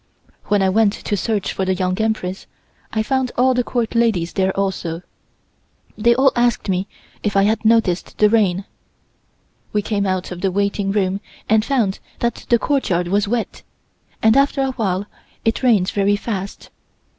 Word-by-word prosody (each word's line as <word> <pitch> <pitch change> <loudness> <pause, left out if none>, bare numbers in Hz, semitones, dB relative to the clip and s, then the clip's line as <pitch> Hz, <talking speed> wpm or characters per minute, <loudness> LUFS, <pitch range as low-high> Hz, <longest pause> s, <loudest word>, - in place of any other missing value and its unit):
When 205 -1 +2
I 190 - +3
went 205 +1 +3
to 210 - -3
search 205 0 -1
for 190 - -2
the 190 0 +1
Young 185 +2 -1
Empress 210 -4 -2 0.4
I 220 - 0
found 260 +1 0
all 255 +1 +4
the 250 0 +1
Court 235 -2 -2
ladies 220 -8 +1
there 190 -1 +1
also. 180 -3 -2 0.9
They 235 +2 +3
all 265 +1 +4
asked 240 -3 +1
me 185 +1 0 0.3
if 205 -2 -1
I 195 - +5
had 220 +3 +1
noticed 220 -5 +2
the 210 - +5
rain. 200 -4 +2 1.1
We 210 -1 +1
came 200 -2 -1
out 185 -1 -2
of 180 0 -6
the 195 - +1
waiting 200 +1 0
room 195 -1 0 0.3
and 215 0 +3
found 230 -7 0 0.2
that 235 -1 -3
the 235 - +5
courtyard 190 - 0
was 200 +2 +1
wet, 230 +1 -2 0.6
and 220 +1 +5
after 275 0 +3
a 265 - 0
while 200 -6 -1 0.4
it 225 - +1
rained 215 -8 +3
very 200 0 +2
fast. 200 -2 -5
205 Hz, 170 wpm, -20 LUFS, 190-230 Hz, 1.1 s, I